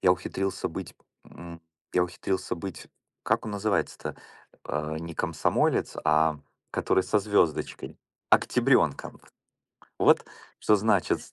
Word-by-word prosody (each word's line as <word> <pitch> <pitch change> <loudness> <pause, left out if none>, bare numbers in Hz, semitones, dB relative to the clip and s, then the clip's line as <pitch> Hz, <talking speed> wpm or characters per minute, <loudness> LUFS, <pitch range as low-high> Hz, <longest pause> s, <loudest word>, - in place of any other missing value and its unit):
я 90 - +6
ухитрился 95 +1 -3
быть, - - -7 0.3
м, 85 -1 -11 0.3
я 90 - +3
ухитрился 95 +1 -3
быть 95 +3 -7 0.4
как - - +1
он 110 - -4
называется-то? 100 +1 -1 0.5
А, 75 +1 -3
не 85 0 -7
комсомолец, 85 -1 0
а 75 0 +3 0.3
который 95 - +1
со 105 - +2
звёздочкой? 100 -6 0 0.3
Октябрёнком! - - +2 0.8
Вот - - +5 0.3
что 105 - +4
значит: 105 -2 +2
90 Hz, 110 wpm, -27 LUFS, 80-100 Hz, 0.8 s, я